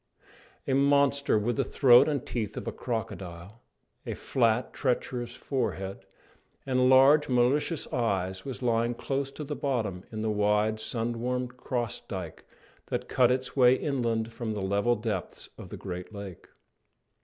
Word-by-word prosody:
A 135 Hz, -, +1 dB
monster, 140 Hz, -1 st, +3 dB
with 115 Hz, +5 st, -1 dB
the 135 Hz, -, +2 dB
throat 130 Hz, -1 st, +6 dB
and 145 Hz, -4 st, -2 dB
teeth 110 Hz, -4 st, -4 dB
of -, -, -5 dB
a -, -, -1 dB
crocodile, 105 Hz, -4 st, -6 dB, 0.4 s
a -, -, -4 dB
flat, 115 Hz, -1 st, +1 dB
treacherous 125 Hz, -2 st, -2 dB
forehead, 100 Hz, -8 st, -3 dB, 0.6 s
and 130 Hz, -1 st, +3 dB
large, 135 Hz, +3 st, +6 dB
dull, 125 Hz, -, 0 dB
malicious 140 Hz, +6 st, +2 dB
eyes, 95 Hz, -6 st, -1 dB
was 130 Hz, -1 st, -6 dB
lying 120 Hz, 0 st, +1 dB
close 135 Hz, +2 st, -2 dB
to 150 Hz, -, -8 dB
the 150 Hz, +1 st, -4 dB
bottom 115 Hz, -11 st, -2 dB
in 110 Hz, -1 st, -4 dB
the 110 Hz, -, 0 dB
wide, 105 Hz, +1 st, +1 dB
sun 115 Hz, +1 st, -2 dB
warmed 125 Hz, 0 st, -2 dB
cross 120 Hz, -3 st, -3 dB
dyke 90 Hz, -5 st, -7 dB, 0.4 s
that -, -, -3 dB
cut 125 Hz, -2 st, +4 dB
its 130 Hz, +1 st, -1 dB
way 125 Hz, -2 st, +6 dB
inland 115 Hz, -5 st, -1 dB
from 115 Hz, -2 st, -4 dB
the 100 Hz, -, -3 dB
level 100 Hz, +5 st, +2 dB
depths 105 Hz, -4 st, -4 dB
of -, -, -10 dB
the -, -, -7 dB
great 90 Hz, 0 st, -6 dB
lake. 100 Hz, -4 st, -9 dB
120 Hz, 155 wpm, -28 LUFS, 105-130 Hz, 0.6 s, throat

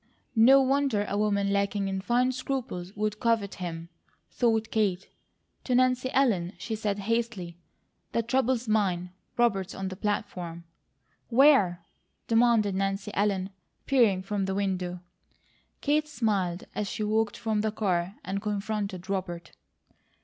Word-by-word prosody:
"No 265 Hz, +5 st, +7 dB
wonder 265 Hz, -6 st, +1 dB
a -, -, -2 dB
woman 200 Hz, -1 st, +1 dB
lacking 200 Hz, 0 st, 0 dB
in 190 Hz, 0 st, -2 dB
fine 245 Hz, +5 st, +2 dB
scruples 255 Hz, -8 st, -4 dB
would 210 Hz, 0 st, -2 dB
covet 225 Hz, -4 st, +1 dB
him," 165 Hz, -1 st, -5 dB, 0.4 s
thought 225 Hz, -2 st, +1 dB
Kate. 195 Hz, -4 st, 0 dB, 0.6 s
To 250 Hz, -, +1 dB
Nancy 255 Hz, 0 st, +3 dB
Ellen 205 Hz, -10 st, +2 dB
she 225 Hz, -, -5 dB
said 210 Hz, -2 st, -1 dB
hastily: 205 Hz, -5 st, -2 dB, 0.5 s
"The 230 Hz, -, 0 dB
trouble's 250 Hz, 0 st, +1 dB
mine. 185 Hz, -5 st, +1 dB, 0.3 s
Robert's 200 Hz, -6 st, +1 dB
on 190 Hz, 0 st, -3 dB
the 185 Hz, -, -6 dB
platform." 180 Hz, -4 st, -3 dB, 0.7 s
"Where?" 230 Hz, -, +5 dB, 0.4 s
demanded 230 Hz, -3 st, +3 dB
Nancy 195 Hz, +2 st, -1 dB
Ellen, 195 Hz, -2 st, 0 dB, 0.3 s
peering 225 Hz, -9 st, +3 dB
from 195 Hz, 0 st, -1 dB
the 190 Hz, 0 st, -2 dB
window. 185 Hz, -3 st, -2 dB, 0.8 s
Kate 300 Hz, +1 st, +1 dB
smiled 200 Hz, -, -1 dB
as 205 Hz, -1 st, -2 dB
she 215 Hz, -, -3 dB
walked 215 Hz, 0 st, 0 dB
from 220 Hz, -2 st, 0 dB
the 215 Hz, 0 st, 0 dB
car 190 Hz, -3 st, -1 dB
and 195 Hz, +1 st, -2 dB
confronted 205 Hz, -3 st, -3 dB
Robert. 175 Hz, -3 st, -4 dB
205 Hz, 135 wpm, -28 LUFS, 190-230 Hz, 0.8 s, No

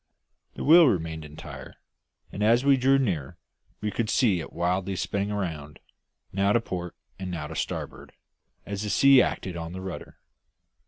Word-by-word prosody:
The -, -, -5 dB
wheel 165 Hz, +1 st, +8 dB
remained 80 Hz, -7 st, -1 dB
entire, 75 Hz, -3 st, -10 dB, 0.6 s
and 100 Hz, -, -6 dB
as 115 Hz, +5 st, +3 dB
we 140 Hz, -1 st, +6 dB
drew 135 Hz, +1 st, +3 dB
nearer 90 Hz, -, -2 dB, 0.4 s
we 105 Hz, 0 st, -2 dB
could 110 Hz, 0 st, -2 dB
see 105 Hz, -9 st, +3 dB
it 80 Hz, -, -7 dB
wildly 90 Hz, +2 st, -1 dB
spinning 100 Hz, +2 st, -2 dB
round, 80 Hz, -8 st, -4 dB, 0.6 s
now 100 Hz, +1 st, +2 dB
to 120 Hz, -, +4 dB
port 90 Hz, -6 st, -6 dB, 0.2 s
and 95 Hz, -1 st, -5 dB
now 85 Hz, -4 st, -4 dB
to 80 Hz, +2 st, -8 dB
starboard, -, -, -5 dB, 0.5 s
as 100 Hz, 0 st, -4 dB
the 105 Hz, -, -3 dB
sea 135 Hz, +6 st, +6 dB
acted 95 Hz, -6 st, -2 dB
on 85 Hz, 0 st, -6 dB
the 95 Hz, -, -6 dB
rudder. 95 Hz, -2 st, -8 dB
95 Hz, 165 wpm, -26 LUFS, 85-110 Hz, 0.6 s, wheel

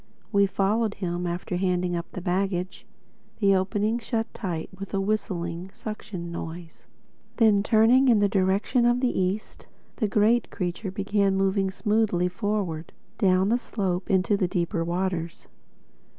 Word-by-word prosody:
We 200 Hz, -2 st, +4 dB
followed 210 Hz, +3 st, 0 dB
him, 175 Hz, -2 st, -3 dB
after 175 Hz, +1 st, -3 dB
handing 180 Hz, -1 st, 0 dB
up 170 Hz, 0 st, -5 dB
the 185 Hz, -, -6 dB
baggage. 185 Hz, 0 st, -2 dB, 0.5 s
The 200 Hz, -2 st, +4 dB
opening 210 Hz, +4 st, 0 dB
shut 225 Hz, -1 st, -2 dB
tight 175 Hz, -7 st, -4 dB
with 195 Hz, +1 st, -5 dB
a -, -, +1 dB
whistling 185 Hz, -4 st, -2 dB
suction 210 Hz, -5 st, -6 dB
noise. 170 Hz, 0 st, -8 dB, 0.5 s
Then 215 Hz, -4 st, +5 dB
turning 225 Hz, +5 st, +4 dB
in 230 Hz, -, +6 dB
the 205 Hz, 0 st, +3 dB
direction 200 Hz, +5 st, +2 dB
of 240 Hz, +1 st, +3 dB
the 255 Hz, -1 st, 0 dB
East, 190 Hz, +3 st, -2 dB, 0.3 s
the 215 Hz, -, +1 dB
great 220 Hz, +4 st, +2 dB
creature 180 Hz, +2 st, -3 dB
began 200 Hz, 0 st, +1 dB
moving 195 Hz, 0 st, +1 dB
smoothly 205 Hz, -3 st, +1 dB
forward, 185 Hz, -5 st, -3 dB, 0.3 s
down 190 Hz, 0 st, +3 dB
the 240 Hz, +2 st, +2 dB
slope 190 Hz, -6 st, -3 dB
into 190 Hz, +2 st, +3 dB
the 195 Hz, -3 st, +1 dB
deeper 175 Hz, -2 st, -1 dB
waters. 175 Hz, -1 st, -3 dB
195 Hz, 145 wpm, -26 LUFS, 180-215 Hz, 0.5 s, in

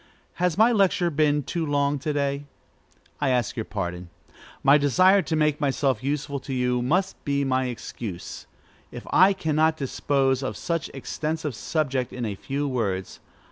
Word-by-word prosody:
Has 180 Hz, -3 st, +1 dB
my 225 Hz, +3 st, +6 dB
lecture 190 Hz, -5 st, +2 dB
been 150 Hz, -1 st, +2 dB
too 170 Hz, +5 st, -3 dB
long 145 Hz, -1 st, +1 dB
to 150 Hz, +3 st, -2 dB
day? 140 Hz, 0 st, -1 dB, 0.7 s
I 145 Hz, -, +1 dB
ask 125 Hz, -3 st, 0 dB
your 110 Hz, -3 st, -3 dB
pardon. 90 Hz, -3 st, -5 dB, 0.5 s
My 140 Hz, +2 st, +6 dB
desire 185 Hz, +8 st, +5 dB
to 160 Hz, -2 st, -2 dB
make 150 Hz, -1 st, +1 dB
myself 135 Hz, -3 st, +1 dB
useful 140 Hz, 0 st, -2 dB
to 135 Hz, 0 st, -5 dB
you 125 Hz, -1 st, +1 dB
must 180 Hz, +10 st, 0 dB
be 140 Hz, 0 st, 0 dB
my 130 Hz, -1 st, +1 dB
excuse, 115 Hz, -6 st, -6 dB, 0.4 s
if -, -, -9 dB
I 190 Hz, +2 st, +7 dB
cannot 160 Hz, -3 st, +1 dB
dispose 135 Hz, -1 st, 0 dB
of 135 Hz, -, -4 dB
such 165 Hz, -3 st, -2 dB
an -, -, -14 dB
extensive 155 Hz, +2 st, -3 dB
subject 130 Hz, +3 st, -1 dB
in 125 Hz, -2 st, -4 dB
a 105 Hz, -, -2 dB
few 140 Hz, +8 st, -3 dB
words. 100 Hz, -8 st, -2 dB
140 Hz, 165 wpm, -25 LUFS, 130-155 Hz, 0.7 s, I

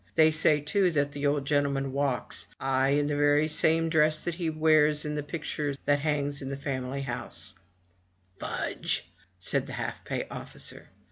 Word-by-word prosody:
They 160 Hz, 0 st, +6 dB
say, 155 Hz, -1 st, +4 dB
too, 180 Hz, +6 st, +2 dB
the 145 Hz, -2 st, 0 dB
old 145 Hz, -1 st, +1 dB
gentleman 140 Hz, -1 st, +1 dB
walks; 135 Hz, -2 st, -1 dB
aye, 135 Hz, 0 st, +2 dB
and 145 Hz, +1 st, +3 dB
in -, -, 0 dB
the 145 Hz, 0 st, 0 dB
very 145 Hz, +1 st, +4 dB
same 160 Hz, +1 st, +2 dB
dress 155 Hz, -1 st, +3 dB
that 175 Hz, -, -2 dB
he 170 Hz, -1 st, -2 dB
wears 155 Hz, -1 st, +3 dB
in 150 Hz, -, -2 dB
the 150 Hz, -, -1 dB
picture 145 Hz, -1 st, -3 dB
that 145 Hz, 0 st, +3 dB
hangs 145 Hz, -1 st, 0 dB
up -, -, -10 dB
in 135 Hz, -, -5 dB
the 140 Hz, -, -4 dB
family 140 Hz, -1 st, -3 dB
house/* 120 Hz, -3 st, -4 dB, 0.9 s
"Fudge!'' -, -, -2 dB, 0.3 s
said 90 Hz, -, -1 dB
the -, -, -7 dB
half -, -, -4 dB
pay -, -, -3 dB
officer. -, -, -7 dB
145 Hz, 180 wpm, -28 LUFS, 140-155 Hz, 0.9 s, They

